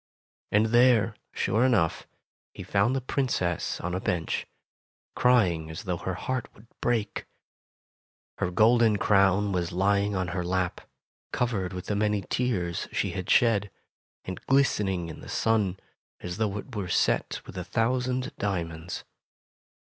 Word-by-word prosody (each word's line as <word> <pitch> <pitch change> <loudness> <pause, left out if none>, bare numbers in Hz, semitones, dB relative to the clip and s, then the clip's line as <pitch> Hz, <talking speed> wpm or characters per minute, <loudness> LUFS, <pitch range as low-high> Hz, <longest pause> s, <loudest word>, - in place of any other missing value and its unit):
And 105 +2 +4
there, 120 -4 +5 0.2
sure 110 +4 +1
enough, 105 -11 +2 0.5
he - - -7
found 100 +6 +2
the 135 - -1
Princess 120 - -1
on 90 +1 -3
a 90 - -1
bench, 90 -5 -2 0.7
crying 90 -11 +3
as 80 - -7
though 90 -2 -2
her 95 +1 -4
heart 130 +7 -3
would 105 - -17 0.2
break. 110 -4 -1 1.1
Her - - 0
golden 110 +3 +4
crown 100 0 +3
was 90 -2 -1
lying 100 +2 +1
on 95 -2 -1
her 90 0 -2
lap, 90 0 -1 0.5
covered 110 -7 -1
with 90 -1 -6
the 105 - -1
many 105 -1 +1
tears 95 -9 -1
she - - -1
had 95 -2 -5
shed, 105 -4 +4 0.6
and 95 - -6
glistening 105 -10 +2
in 80 - -9
the - - -10
sun, 105 -5 +1 0.4
as 90 +1 -6
though 105 -2 -1
it 120 +3 -8
were 100 -3 -3
set - - +1
with - - -11
a 90 - -3
thousand 125 +5 0
diamonds. 85 -4 -3
100 Hz, 145 wpm, -27 LUFS, 90-115 Hz, 1.1 s, there